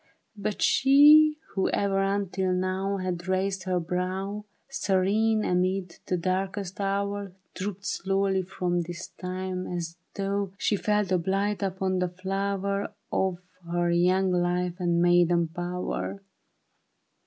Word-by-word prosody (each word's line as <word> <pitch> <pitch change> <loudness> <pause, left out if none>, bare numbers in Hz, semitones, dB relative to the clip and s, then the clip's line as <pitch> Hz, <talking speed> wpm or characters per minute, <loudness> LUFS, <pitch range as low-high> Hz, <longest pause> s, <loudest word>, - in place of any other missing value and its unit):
But 210 0 -2
she 300 +3 +7
who 195 - 0
ever 195 -1 +1
until 195 -1 0
now 185 +2 -1
Had 180 -2 -4
raised 190 0 -1
her 185 -1 +1
brow. 185 +4 -3 0.2
Serene 215 -2 +1
amid 185 0 0
the 180 - +1
darkest 190 +2 -2
hour, 200 0 -2 0.2
Drooped 195 0 -5
slowly 195 0 0
from 175 -1 -1
this 170 +1 -7
time 185 0 -4
as 170 -1 -4 0.2
though 200 -1 -2
She 210 - +1
felt 210 -1 0
a 185 - +3
blight 195 +4 0
upon 190 -1 -1
the 180 -1 0
flower 195 +2 -2 0.2
Of 185 -2 0 0.3
her 175 0 +1
young 185 +2 +3
life 180 0 0
and 175 -1 +2
maiden 175 -1 +4
power. 180 +3 -4
190 Hz, 125 wpm, -27 LUFS, 180-200 Hz, 0.3 s, she